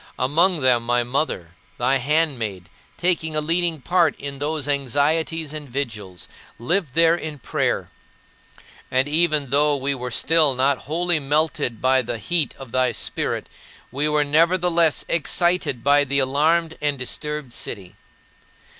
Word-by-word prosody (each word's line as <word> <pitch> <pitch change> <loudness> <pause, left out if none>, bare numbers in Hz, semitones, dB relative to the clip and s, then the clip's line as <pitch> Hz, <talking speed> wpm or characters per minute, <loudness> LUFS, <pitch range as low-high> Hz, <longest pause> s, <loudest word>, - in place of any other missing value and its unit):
Among 160 +6 +2
them 125 -2 +3
my 120 +1 +1
mother, 120 - -2 0.3
thy 130 +3 +2
handmaid, 125 - -1 0.3
taking 165 -3 0
a - - +2
leading 165 0 0
part 175 0 +2
in 140 -1 -6
those 150 0 -2
anxieties 145 +3 0
and 150 -3 -7
vigils, 110 - -5 0.3
lived 160 - -1
there 165 0 +5
in 155 -3 -6
prayer. 125 - -2 1.0
And 130 +2 +1
even 150 -3 +1
though 145 +1 +3
we 140 +1 -1
were 125 -2 -5
still 150 +2 +3
not 135 +1 +2
wholly 175 +1 +1
melted 145 -5 0
by 130 0 +4
the 120 -1 -4
heat 165 +6 -1
of 135 -4 -11
thy 130 -1 +1
Spirit, - - -3 0.4
we 145 +4 0
were 150 0 +2
nevertheless 165 +2 +2
excited 170 -6 0
by 145 +1 +4
the 140 0 -1
alarmed 155 +5 +1
and 145 -1 0
disturbed 150 +1 -4
city. 100 -5 -7
145 Hz, 140 wpm, -22 LUFS, 130-160 Hz, 1.0 s, there